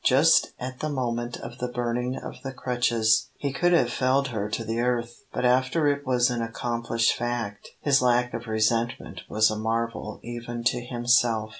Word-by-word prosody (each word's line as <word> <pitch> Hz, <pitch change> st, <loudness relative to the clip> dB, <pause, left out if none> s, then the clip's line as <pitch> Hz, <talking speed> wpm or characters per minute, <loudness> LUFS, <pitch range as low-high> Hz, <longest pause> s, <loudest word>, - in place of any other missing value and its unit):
Just -, -, +4 dB
at 125 Hz, 0 st, -6 dB
the 155 Hz, -, -2 dB
moment 120 Hz, -3 st, -2 dB
of -, -, -9 dB
the 125 Hz, -, -1 dB
burning 125 Hz, +1 st, -2 dB
of -, -, -8 dB
the 135 Hz, -, -5 dB
crutches 120 Hz, -4 st, +1 dB
he 140 Hz, -2 st, -3 dB
could 175 Hz, +5 st, +2 dB
have 125 Hz, -9 st, +3 dB
felled 130 Hz, +1 st, +2 dB
her 105 Hz, -3 st, -3 dB
to 115 Hz, +1 st, -2 dB
the 115 Hz, +1 st, -2 dB
earth, 120 Hz, -1 st, 0 dB, 0.2 s
but -, -, -2 dB
after 130 Hz, +5 st, +2 dB
it 145 Hz, -1 st, 0 dB
was 125 Hz, -1 st, +3 dB
an 120 Hz, -1 st, -2 dB
accomplished 115 Hz, 0 st, 0 dB
fact 120 Hz, -4 st, -4 dB
his 140 Hz, -2 st, +3 dB
lack 125 Hz, -1 st, +2 dB
of 115 Hz, 0 st, -5 dB
resentment 115 Hz, +2 st, 0 dB
was 110 Hz, 0 st, +3 dB
a 110 Hz, -, -3 dB
marvel 115 Hz, -1 st, -2 dB
even 120 Hz, 0 st, -6 dB
to 120 Hz, +1 st, +1 dB
himself. 120 Hz, -2 st, +2 dB
120 Hz, 180 wpm, -26 LUFS, 115-125 Hz, 0.2 s, Just